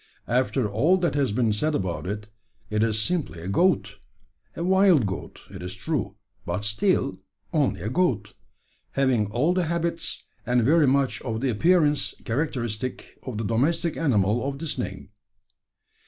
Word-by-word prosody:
After 125 Hz, -1 st, +1 dB
all 140 Hz, -, +3 dB
that 175 Hz, -2 st, 0 dB
has 140 Hz, -5 st, +1 dB
been 110 Hz, 0 st, +1 dB
said 150 Hz, +8 st, 0 dB
about 90 Hz, -4 st, -2 dB
it, 105 Hz, +1 st, -4 dB, 0.5 s
it 105 Hz, 0 st, +1 dB
is 110 Hz, -1 st, +1 dB
simply 160 Hz, -, -1 dB
a 85 Hz, -, -7 dB
goat 105 Hz, -, +1 dB, 0.6 s
a 170 Hz, -, -3 dB
wild 185 Hz, -, +5 dB
goat, 95 Hz, -2 st, -5 dB
it -, -, -8 dB
is 90 Hz, +1 st, -5 dB
true, 110 Hz, -, -2 dB, 0.3 s
but 105 Hz, -, -3 dB
still 105 Hz, 0 st, +1 dB, 0.3 s
only -, -, +1 dB
a 105 Hz, -, -2 dB
goat 120 Hz, -, 0 dB, 0.6 s
having 130 Hz, -6 st, +2 dB
all 125 Hz, -, +1 dB
the 180 Hz, -1 st, +1 dB
habits, 170 Hz, +1 st, -2 dB, 0.2 s
and 125 Hz, -1 st, +2 dB
very 150 Hz, +4 st, +4 dB
much 135 Hz, 0 st, +1 dB
of 110 Hz, -3 st, -3 dB
the 135 Hz, -2 st, +1 dB
appearance 150 Hz, -, +2 dB
characteristic 125 Hz, -3 st, -3 dB
of 125 Hz, -4 st, -4 dB
the 110 Hz, -, -2 dB
domestic 140 Hz, -, +1 dB
animal 115 Hz, -7 st, +2 dB
of 140 Hz, 0 st, -3 dB
this 160 Hz, +1 st, -3 dB
name. 100 Hz, -5 st, -5 dB
125 Hz, 155 wpm, -25 LUFS, 105-160 Hz, 0.6 s, wild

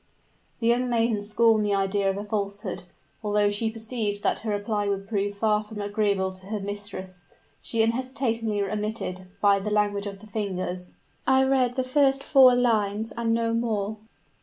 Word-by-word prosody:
The 230 Hz, -, -3 dB
young 245 Hz, +2 st, +2 dB
maiden 230 Hz, -3 st, +1 dB
scorned 215 Hz, +1 st, +3 dB
the 205 Hz, -1 st, +1 dB
idea 195 Hz, 0 st, +1 dB
of 195 Hz, -, -1 dB
a 205 Hz, -, -4 dB
falsehood; 200 Hz, -3 st, -4 dB, 0.4 s
although 205 Hz, -1 st, +2 dB
she 220 Hz, +2 st, -1 dB
perceived 220 Hz, -2 st, -3 dB
that -, -, +1 dB
her 220 Hz, -, -5 dB
reply 205 Hz, 0 st, -1 dB
would 195 Hz, 0 st, -2 dB
prove 205 Hz, -1 st, -1 dB
far 215 Hz, 0 st, +2 dB
from 210 Hz, 0 st, -9 dB
agreeable 205 Hz, -2 st, 0 dB
to 185 Hz, 0 st, -12 dB
her 210 Hz, 0 st, -3 dB
mistress, 195 Hz, -3 st, -7 dB, 0.4 s
she 225 Hz, -1 st, +1 dB
unhesitatingly 230 Hz, -3 st, -1 dB
admitted, 200 Hz, -2 st, -3 dB
by 200 Hz, -1 st, +5 dB
the 205 Hz, +2 st, -3 dB
language 205 Hz, -1 st, +1 dB
of 200 Hz, -1 st, -6 dB
the 205 Hz, -, -15 dB
hands. 185 Hz, -4 st, -4 dB, 0.3 s
"I 265 Hz, 0 st, +5 dB
read 260 Hz, -2 st, +2 dB
the 260 Hz, -, 0 dB
first 270 Hz, +1 st, +2 dB
four 260 Hz, -2 st, +7 dB
lines, 220 Hz, -3 st, +1 dB
and 230 Hz, -1 st, -1 dB
no 230 Hz, 0 st, +1 dB
more." 220 Hz, -2 st, -1 dB
210 Hz, 170 wpm, -26 LUFS, 200-230 Hz, 0.4 s, four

